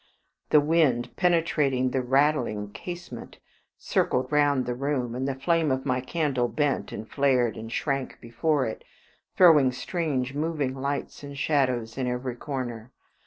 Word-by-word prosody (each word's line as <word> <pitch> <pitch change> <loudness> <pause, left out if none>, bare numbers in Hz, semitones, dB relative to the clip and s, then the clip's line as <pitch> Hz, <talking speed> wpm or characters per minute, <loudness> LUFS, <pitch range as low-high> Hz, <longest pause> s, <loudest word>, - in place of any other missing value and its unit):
The 150 - +6
wind 145 -5 +1
penetrating 150 -7 +1
the 130 - 0
rattling 125 -6 +1
casement 175 - -8 0.4
circled 130 +3 0
round 145 -3 +3
the 125 - -2
room, 130 -2 -2
and 130 +2 -2
the 135 - -2
flame 160 +3 +1
of 130 0 -1
my 130 -2 0
candle 135 -3 0
bent 145 +2 -1
and 110 - -7
flared 130 -4 +2
and 115 +1 -8
shrank 135 -1 -2
before 130 +5 0
it, 110 - -5 0.5
throwing 155 -8 +7
strange 130 -1 -2
moving 150 -3 -1
lights 140 +1 -4
and 140 -1 -8
shadows 130 -5 0
in 130 - -1
every 125 0 -3
corner. 125 -3 -5
135 Hz, 145 wpm, -26 LUFS, 125-150 Hz, 0.5 s, throwing